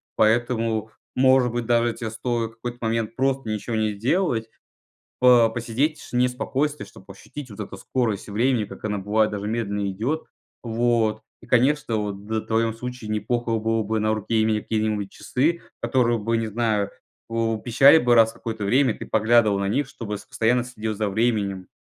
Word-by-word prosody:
поэтому, 110 -1 +1 0.3
может 130 -1 +4
быть, 120 0 -2
даже 120 0 +2
те 115 - -5
стоит 115 0 -2
в - - -22
какой-то 120 +2 -6
момент 115 -1 -2
просто 135 -3 0
ничего 110 +2 -3
не 110 -1 +1
сделать, 115 - 0 0.7
по 125 -3 +6
посидеть 120 +7 -1
в - - -14
тишине 125 0 +1
и - - -3
спокойствии, 140 +4 -2
чтоб 95 - -17
ощутить 125 +7 -10
вот 105 - -12
эту 105 - -6
скорость 110 -6 -2
времени, 115 +3 +1
как 105 - -10
она 105 -2 -1
бывает 105 +2 +1
даже 105 0 -4
медленно 105 -3 -2
идет. 125 +12 -2 0.4
Вот. 115 -2 +1 0.2
И, 115 - -16
конечно, 125 0 +2
вот 100 -1 -4
д 110 +1 -1
в - - -15
твоём 115 0 +1
случае 125 -1 -7
не 110 0 0
плохо 120 +2 -2
было 115 0 0
бы 110 +1 -1
на 110 +1 +1
руке 110 +1 0
иметь 110 -1 0
какие-нибудь 110 -2 -1
часы, 160 +7 -1 0.2
которые 120 -3 +2
бы- 115 +2 0
не 115 - -1
знаю- 110 -2 0 0.4
пу 115 -1 -1
пищали 135 +5 +6
бы 120 -5 +3
раз 115 -1 +6
в - - -20
какое-то 110 -2 -5
время, 125 +2 +3
ты - - -8
поглядывал 110 -1 +3
на 100 - -1
них, 135 +7 0
чтобы 105 -6 -6
с - - -14
постоянно 120 +2 +1
следил 110 -3 -4
за 105 0 -1
временем. 100 -3 0
115 Hz, 190 wpm, -24 LUFS, 110-120 Hz, 0.7 s, по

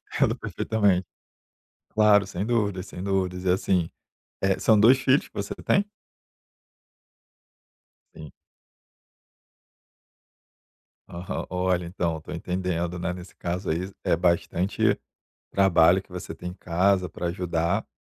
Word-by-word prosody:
Entendo - - +2
perfeitamente. 100 -5 0 0.9
Claro, 105 -2 +5
sem 95 +1 -4
dúvidas, 100 -5 0
sem 90 - -8
dúvidas. 95 -2 -1
E, 90 - +2
assim, 90 -2 +1 0.5
eh, 95 -1 +1
são 110 -2 +4
2 120 +5 +7
filhos 135 +1 +2
que - - -31
você 100 0 -4
tem? 200 +1 +3 2.3
Sim. 75 -4 -10 2.8
Aham. 85 +2 -5
Olha, 90 -1 0
então, 85 -1 -2
eu - - -4
estou 80 - -9
entendendo, 90 0 -2
né. 90 0 -2
Nesse 90 +1 -11
caso 90 +2 -3
aí, 90 +5 -2
é - - +2
bastante 90 +4 +1 0.5
trabalho 95 -1 +4
que - - -30
você 90 -2 -7
tem 90 +2 -7
em 90 - -9
casa 90 +1 +1
pra 85 +2 -5
ajudar, 85 +3 -1
90 Hz, 125 wpm, -25 LUFS, 85-100 Hz, 2.8 s, 2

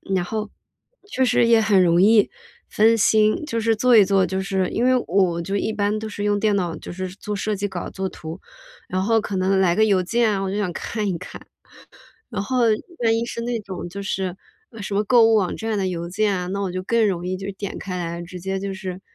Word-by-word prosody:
然 180 -2 0
后 215 +2 -4 0.6
确 265 - 0
实 245 -2 +3
也 230 -1 +5
很 205 -4 +4
容 170 0 +4
易 210 +1 +5 0.4
分 225 +2 +3
心， 215 +5 +3
就 230 -5 -2
是 225 0 +2
做 245 +2 +4
一 210 - +8
做， 195 -1 +2
就 190 +1 -2
是 190 -1 -1
因 235 - -1
为 255 +1 +4
我 180 -2 +2
就 195 +4 -3
一 210 +2 0
般 210 0 -1
都 220 - -5
是 205 -1 -5
用 205 0 +1
电 210 -1 +2
脑， 175 -4 -1
就 - - -9
是 185 +1 -5
做 210 +2 -6
设 210 +1 -2
计 205 +1 -2
稿 - - -5
做 190 0 -3
图。 160 +2 -9 0.5
然 185 - -2
后 225 +1 +2
可 205 -1 -4
能 190 +1 +2
来 180 -2 +3
个 220 +2 +4
邮 195 -3 +3
件 225 +4 +1
啊， 195 - -1
我 195 - -2
就 200 - -3
想 195 -4 -1
看 215 +3 -3
一 185 - -1
看， 180 - -10 0.8
然 205 -4 -3
后 255 +4 -1 0.4
万 225 0 +3
一 230 - -1
是 235 - -6
那 240 0 -2
种 190 -3 -7
就 200 +3 -7
是 190 -2 -2 0.5
什 200 - -5
么 205 - +2
购 235 +1 +5
物 225 - +4
网 190 -4 +1
站 220 -1 -2
的 190 - 0
邮 170 -2 -4
件 205 +3 +1
啊， 180 -1 -3
那 200 +2 -3
我 190 -2 -2
就 185 +1 -3
更 230 +3 +2
容 180 -3 -2
易 185 - -1
就 195 - -7
点 200 -1 -5
开 185 -2 -5
来， 170 -1 -4
直 180 +1 -9
接 190 +2 -3
就 195 0 -4
是 190 -1 -6
200 Hz, 265 characters per minute, -22 LUFS, 185-220 Hz, 0.8 s, 一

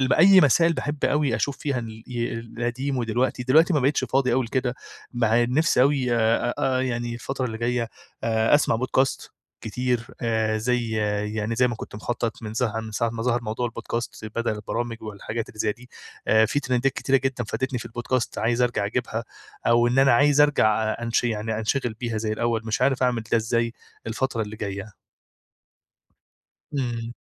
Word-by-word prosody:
الب 130 0 +2
أي 190 +3 +7
مسائل، 165 +3 +4
باحب 145 -2 -3
أوي 145 -4 +2
أشوف 140 -1 -1
فيها 140 -4 -1
ال 110 -1 -8
ي 120 -1 -3
القديم 120 +4 -3
ودلوقتي. 120 +2 0
دلوقتي 155 +8 +4
ما 145 - +3
بقِيتِش 135 0 +2
فاضي 130 0 +1
أوي 130 +1 +2
لكده، 125 +1 -1 0.4
مع 120 0 +3
إن 120 - -1
نِفسي 160 -4 +4
أوي 135 -3 +2
آآ 115 +1 +2
آآ، 130 -1 +1
يعني 120 -2 -2
الفترة 130 +2 -4
اللي 110 -2 -5
جاية، 120 0 0 0.4
آآ، 110 +2 +3
أسمَع 145 - +3
podcast 130 +2 0 0.3
كتير، 125 +1 -2
آآ، 110 -2 +1
زي 120 +1 0 0.5
يعني 110 +2 -1
زي 125 0 +4
ما 120 - -2
كنت 110 - -9
مخطط، 115 +1 -3
من 110 0 -6
ظه 115 -2 0
من 110 -1 -8
ساعة 115 +2 0
ما 115 0 -4
ظهَر 120 0 +1
موضوع 115 +2 -2
الpodcasts 115 -1 -5
بدل 115 0 0
البرامِج 115 +2 -4
والحاجات 110 +1 -5
اللي 110 - -14
زي 105 -1 +1
دي. 125 +3 -17 0.4
آآ، 110 0 +5
في 145 - 0
تريندات 130 0 +1
كتيرة 135 - +1
جدًا 130 -2 -1
فادِتني 130 +4 -2
في 120 - -7
الpodcast، 120 +1 -2
عايِز 120 +2 +1
أرجع 110 -4 +1
أجيبها، 115 0 -2 0.4
أو 120 0 +4
إن 125 +2 +1
أنا 135 -2 +6
عايِز 145 +3 +4
أرجع 110 -7 +4
أ 110 +2 -2
أنش 120 +1 +1
يعني 110 -1 -1
أنشغِل 115 +1 -1
بيها 115 -3 -2
زي 110 0 -2
الأوَّل، 115 +1 0
مش 110 +2 -1
عارِف 135 0 +2
أعمل 125 -3 +1
ده - - +6
إزاي 115 +1 0 0.3
الفترة 115 0 -1
اللي 105 +1 -7
جاية. 100 0 -6 1.8
إمم. 120 -3 -2
120 Hz, 185 wpm, -24 LUFS, 110-130 Hz, 1.8 s, أي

